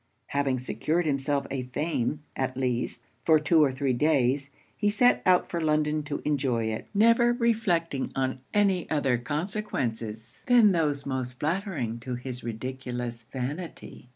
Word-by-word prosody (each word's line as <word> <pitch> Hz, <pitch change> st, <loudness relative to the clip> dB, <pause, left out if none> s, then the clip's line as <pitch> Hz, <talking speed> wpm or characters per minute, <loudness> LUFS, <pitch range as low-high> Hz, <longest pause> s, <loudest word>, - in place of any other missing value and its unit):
Having 140 Hz, -2 st, +1 dB
secured 150 Hz, +8 st, -1 dB
himself 140 Hz, -1 st, 0 dB
a 135 Hz, -1 st, -1 dB
fame, 145 Hz, +2 st, -2 dB
at 130 Hz, -1 st, -2 dB
least, 125 Hz, -2 st, -1 dB, 0.2 s
for 160 Hz, -1 st, +6 dB
two 155 Hz, +1 st, +4 dB
or 140 Hz, -, +3 dB
three 130 Hz, 0 st, 0 dB
days, 135 Hz, 0 st, +2 dB, 0.3 s
he 210 Hz, -, +1 dB
set 245 Hz, +4 st, +4 dB
out 180 Hz, -1 st, +5 dB
for 170 Hz, -, -3 dB
London 155 Hz, -1 st, +1 dB
to 145 Hz, -1 st, -5 dB
enjoy 135 Hz, -6 st, +1 dB
it; 110 Hz, 0 st, -3 dB
never 230 Hz, +3 st, +5 dB
reflecting 210 Hz, -, 0 dB
on 130 Hz, -1 st, -1 dB
any 195 Hz, -4 st, +2 dB
other 135 Hz, -5 st, +1 dB
consequences 120 Hz, -, -3 dB
than 240 Hz, -5 st, +6 dB
those 150 Hz, -5 st, 0 dB
most 130 Hz, -2 st, -3 dB
flattering 155 Hz, -, -2 dB
to 125 Hz, +1 st, -4 dB
his 125 Hz, 0 st, -6 dB
ridiculous 120 Hz, 0 st, -5 dB
vanity. 140 Hz, 0 st, -6 dB
140 Hz, 145 wpm, -27 LUFS, 125-170 Hz, 0.3 s, for